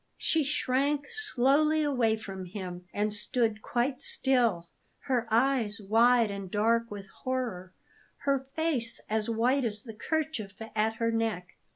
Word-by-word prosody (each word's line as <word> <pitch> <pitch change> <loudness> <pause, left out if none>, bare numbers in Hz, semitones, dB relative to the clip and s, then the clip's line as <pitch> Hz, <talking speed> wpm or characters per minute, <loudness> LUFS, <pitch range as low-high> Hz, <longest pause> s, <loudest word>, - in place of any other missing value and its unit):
She 320 -2 +2
shrank 285 +1 0
slowly 310 - +2
away 245 -7 +2
from 195 -3 -7
him, 180 -2 -7
and 210 +1 0
stood 220 0 0
quite 250 +4 -1
still, 235 -14 +1 0.3
her 245 -3 0
eyes 230 -2 +2
wide 225 +2 +4
and 200 -2 -6
dark 230 +3 +2
with 200 -1 -8
horror, 235 -9 -4 0.5
her 275 -1 0
face 305 -8 0
as 220 +1 0
white 245 +5 +2
as 215 -3 -2
the 225 - -8
kerchief 230 -5 -3 0.2
at 220 +1 +1
her 230 0 0
neck. 225 -6 -1
230 Hz, 140 wpm, -29 LUFS, 210-265 Hz, 0.5 s, wide